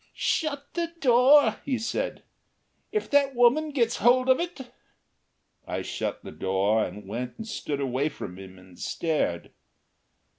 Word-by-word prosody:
"Shut 285 -3 -1
the 340 -1 -2
door," 250 -1 +5
he 265 -3 -1
said. - - -3 0.7
"If 425 - -1
that 280 -2 +3
woman 250 +6 +4
gets 240 -5 +1
hold 255 +2 +4
of 260 - +5
it 310 -8 -6 0.5
" - - -48
I - - -3
shut - - -4
the - - -8
door, 100 +3 +1
and 100 +2 -7
went 120 +4 -5
and 225 - -7
stood 150 -9 -4
away 135 +2 0
from 90 -9 -8
him 95 -1 -11
and 90 -1 -17
stared. 155 - -2
235 Hz, 150 wpm, -26 LUFS, -, 0.7 s, door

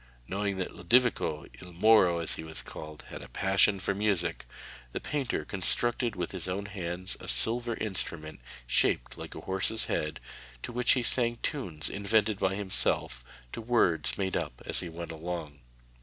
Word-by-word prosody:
Knowing 100 0 -1
that 95 - -3
Lodovico 110 -5 +2 0.2
il 90 -1 -10
Moro, 95 -2 +6
as 85 -1 0
he - - -5
was 80 0 -6
called 75 0 -9
had - - -7
a - - -9
passion 95 +1 +3
for 100 - 0
music, 95 - 0 0.5
the - - -1
painter 145 -4 -2
constructed 120 +4 +2
with 90 -2 -3
his 95 -2 -5
own 100 +2 -2
hands 95 -2 -5
a - - -10
silver 120 0 0
instrument, 85 -8 -4 0.3
shaped 60 0 +2
like - - -8
a - - -6
horse's 95 +4 0
head, 75 0 -1 0.4
to - - -4
which 125 0 +3
he 125 - +1
sang 120 0 +3
tunes 90 - -2
invented 105 +1 +1
by 95 0 +1
himself, 95 -10 +1 0.3
to - - -4
words 110 -8 +2
made 95 -1 -1
up - - -2
as - - +2
he 85 - -2
went 85 0 -6
along. 80 -3 -5
95 Hz, 170 wpm, -30 LUFS, 85-110 Hz, 0.5 s, Moro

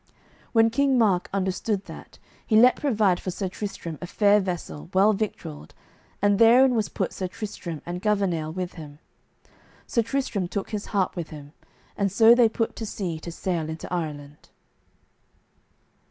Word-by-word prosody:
When 225 -1 +4
King 275 +2 +2
Mark 200 -6 +2
understood 195 +1 -1
that, - - -12 0.3
he 220 - 0
let 245 +3 +7
provide 215 -10 +2
for - - -5
Sir 185 +1 -3
Tristram 180 -5 -6
a 180 - -5
fair 205 +2 +4
vessel, 170 - -5
well 200 +3 +5
victualled, 75 - -5 0.5
and 205 -1 +3
therein 250 +3 +6
was 220 -3 0
put - - -3
Sir 185 - -3
Tristram 180 -5 -7
and 175 +1 -5
Gouvernail, 190 -7 0
with 180 +1 -4
him. 150 -3 -10 0.9
Sir 235 - +1
Tristram 230 -6 -2
took 200 +4 -4
his 210 -2 -4
harp 195 -2 0
with 170 -3 -5
him, 145 -1 -11 0.4
and 200 -2 0
so 225 +3 +7
they 240 -2 +5
put 225 0 -2
to 225 - -4
sea 175 -6 -4
to 170 - -7
sail 170 -2 -3
into 160 +2 -6
Ireland. 150 -4 -5
195 Hz, 160 wpm, -25 LUFS, 170-220 Hz, 0.9 s, let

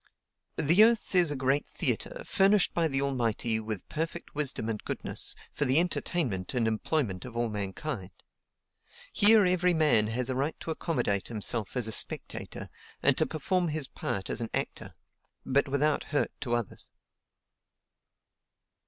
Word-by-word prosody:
"The 170 +8 +5
earth 230 -2 +2
is 175 -3 +5
a 145 - -1
great 135 +2 0
theatre, - - -2
furnished 200 -1 +3
by 170 -1 +2
the 135 -2 -1
Almighty, 115 -4 0
with 110 -3 -5
perfect 165 +2 -4
wisdom 140 -6 -1
and 110 -2 -3
goodness, - - -4 0.2
for 145 - -1
the 130 +3 +4
entertainment 145 - -1
and 115 -2 +1
employment 110 - -1
of 120 -2 -8
all 120 -1 0
mankind. 100 +1 -4 1.0
Here 210 0 +7
every 180 -1 +2
man 140 -10 +3
has 120 +3 -1
a - - -2
right 140 +5 -2
to 165 - -4
accommodate 125 - -1
himself 110 0 -2
as 120 -3 0
a - - -2
spectator, - - -2 0.4
and - - +4
to - - +1
perform 175 +3 -1
his 155 -3 -1
part 95 -5 -4
as 120 - -3
an 115 - -3
actor; - - -4 0.5
but 140 +2 +2
without 145 +2 +1
hurt 145 - 0
to 120 -3 0
others." 120 -5 -5
135 Hz, 155 wpm, -29 LUFS, 115-165 Hz, 1.0 s, Here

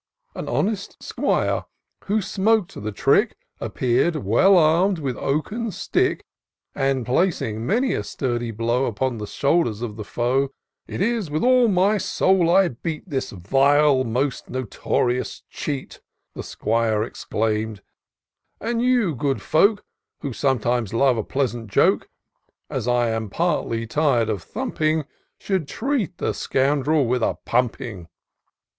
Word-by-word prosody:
An - - -6
honest 200 -1 -1
'Squire, - - 0 0.4
who 210 +2 +1
smok'd 200 0 +1
the 110 +1 -3
trick, 100 - +2 0.2
Appeared 130 +7 +1
well 155 - +4
arm'd 170 +4 +4
with 135 -5 -3
oaken 210 - -2
stick. 195 - -1 0.5
And 135 -2 0
placing 125 - 0
many 255 +5 +2
a - - -2
sturdy 120 -3 -2
blow 115 +4 0
Upon 120 +2 -2
the 105 - -5
shoulders 140 -6 +1
of 110 -3 -5
the 110 - -5
foe, 125 +6 0 0.2
" - - -62
It - - -5
is 220 -4 0
with 155 +1 -1
all 250 -1 +5
my 200 +1 +3
soul 185 -2 +2
I 185 +1 +5
beat 155 +8 -6
This 135 -2 -2
vile, 135 - +3
this 115 - -5
most 130 +3 -1
notorious 125 0 -2
cheat," 140 -3 -5 0.3
The - - -6
'Squire 110 -1 0
exclaim'd; 110 -2 -2 0.4
" - - -53
and 230 +1 -1
you, 245 -8 +2
good 135 +1 -1
folk, 200 +6 +3 0.4
Who 140 - -4
sometimes 120 -4 0
love 130 +1 +4
a 110 - -1
pleasant 120 -4 -2
joke. - - +2 0.6
As 115 - -3
I 120 -1 +2
am 110 -1 -3
partly 115 - -1
tired 120 -3 +1
of 105 -5 -2
thumping, 155 -1 -1 0.3
Should 190 -7 -2
treat 235 - -2
the - - -1
scoundrel 140 +2 +1
with 125 +1 0
a - - 0
pumping." 120 -6 -1
135 Hz, 140 wpm, -23 LUFS, 115-180 Hz, 0.6 s, all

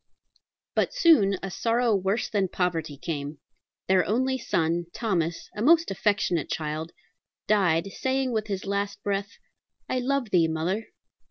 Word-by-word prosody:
But - - 0
soon 305 - +5
a 195 - -4
sorrow 230 +2 +1
worse 195 +3 0
than 200 -3 0
poverty 165 -5 -2
came. 145 -1 -4 0.5
Their 185 -1 +4
only 260 +7 +1
son, 170 -8 0
Thomas, 170 -7 -1
a 210 - -4
most 330 +4 +4
affectionate 195 -4 0
child, 155 +1 -3 0.5
died, 185 -5 +3
saying 265 +2 -1
with 215 -2 -1
his 195 -2 -3
latest 200 0 -2
breath, 200 0 -2 0.5
"I 255 - 0
love 255 -3 -1
thee, 170 -3 +4
mother." 170 +7 -2
195 Hz, 140 wpm, -26 LUFS, 170-230 Hz, 0.5 s, soon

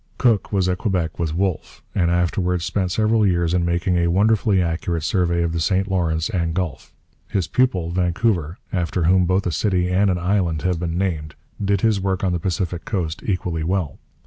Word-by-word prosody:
Cook 115 -6 +2
was 95 -3 +1
at 90 0 0
Quebec 90 -7 -1
with 80 -2 -1
Wolfe, 95 -2 -2
and 85 -3 +1
afterwards 90 0 0
spent 90 0 -1
several 110 +2 +2
years 85 -3 +2
in 90 -1 +2
making 85 +1 0
a 85 0 +2
wonderfully 105 +2 +3
accurate 85 -1 -1
survey 85 -2 +1
of 85 -1 -1
the 85 - -1
St 95 +3 +1
Lawrence 85 -4 0
and 85 -6 -1
Gulf. 90 -5 -3 0.4
His 95 -4 -1
pupil, 90 -6 +1
Vancouver, 90 -1 0 0.2
after 90 -1 -1
whom 90 +2 +4
both 95 +2 +1
a 90 - 0
city 90 +2 0
and 95 +2 +3
an 90 - +1
island 90 -3 0
have 90 -2 0
been 85 -1 -2
named, 80 -5 -2 0.3
did 100 -1 +1
his 110 -3 +2
work 95 -1 -1
on 95 - +1
the 85 - -1
Pacific 90 -1 -2
coast 85 -7 -3
equally 90 -5 -1
well. 85 -4 -2
90 Hz, 195 wpm, -21 LUFS, 85-95 Hz, 0.4 s, whom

